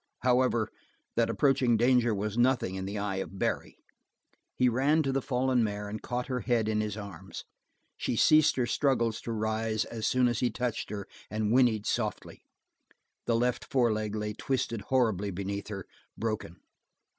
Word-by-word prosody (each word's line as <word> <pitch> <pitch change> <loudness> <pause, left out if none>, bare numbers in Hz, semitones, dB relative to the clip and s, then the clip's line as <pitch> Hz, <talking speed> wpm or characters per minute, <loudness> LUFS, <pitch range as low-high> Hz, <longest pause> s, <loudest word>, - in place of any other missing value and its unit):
However, 125 -3 +2 0.4
that - - +2
approaching 130 -4 +3
danger 120 0 +4
was 105 +1 -3
nothing 120 -5 +2
in 95 0 -4
the 100 +2 -4
eye 100 -1 -2
of 95 0 -5
Barry. - - -2 0.8
He 125 - +3
ran 140 +6 +3
to 135 - 0
the 135 0 0
fallen 125 -1 +1
mare 105 -1 -3
and 105 +1 -5
caught 125 0 -3
her 125 -1 -2
head 115 -1 +1
in 110 -1 +1
his 105 -1 -3
arms. 100 -6 -8 0.5
She - - -1
ceased 155 +5 +5
her 125 - +1
struggles 120 -4 +1
to 115 - -5
rise 110 0 -1
as 110 -2 -3
soon 125 -1 +3
as 120 -2 0
he 125 - +2
touched 125 -2 -3
her 100 -2 -5 0.2
and 105 0 -1
whinneyed 120 -4 +3
softly. - - -2 0.9
The 115 - +3
left 120 +1 +1
foreleg 110 -5 0
lay 105 0 -2
twisted 115 -2 -2
horribly 110 -7 +2
beneath 100 +2 -4
her, 100 -3 -6 0.3
broken. 110 -6 -3
115 Hz, 170 wpm, -29 LUFS, 105-125 Hz, 0.9 s, ceased